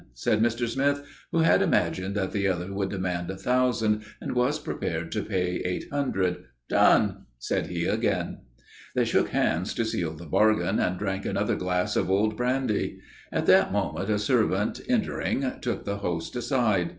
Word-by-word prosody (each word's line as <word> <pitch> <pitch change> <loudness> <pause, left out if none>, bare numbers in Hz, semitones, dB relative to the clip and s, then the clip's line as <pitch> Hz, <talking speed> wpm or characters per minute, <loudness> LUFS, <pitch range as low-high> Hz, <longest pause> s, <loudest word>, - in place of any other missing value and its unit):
said - - +1
Mr. 120 +1 +1
Smith, 140 +4 0 0.3
who 165 - +2
had 165 - +5
imagined 95 +2 +1
that 95 -3 -1
the 100 -1 0
other 90 +1 -2
would 100 -1 -1
demand 90 -2 -2
a 95 - -4
thousand 120 -3 +1 0.2
and - - -4
was 125 +4 +2
prepared 80 - -4
to 105 - -1
pay 90 -3 -1
eight 90 0 -2
hundred. 95 -11 0 0.2
"Done!" - - +3
said - - -2
he - - -2
again. - - 0 0.6
They - - +3
shook - - +2
hands 85 +3 0
to 115 - 0
seal 85 -7 -2
the 85 +2 -10
bargain 110 +5 +2
and 90 0 0
drank 95 0 -2
another - - 0
glass 90 0 -1
of 85 - +1
old 105 +3 +2
brandy. 125 -2 -1 0.3
At - - -1
that - - +5
moment, 90 +6 -1
a 105 - +2
servant, 105 -2 +1
entering, 215 - 0 0.2
took 120 - -3
the 100 0 -2
host 85 -2 -3
aside. 115 -8 +1
100 Hz, 170 wpm, -27 LUFS, 90-120 Hz, 0.6 s, had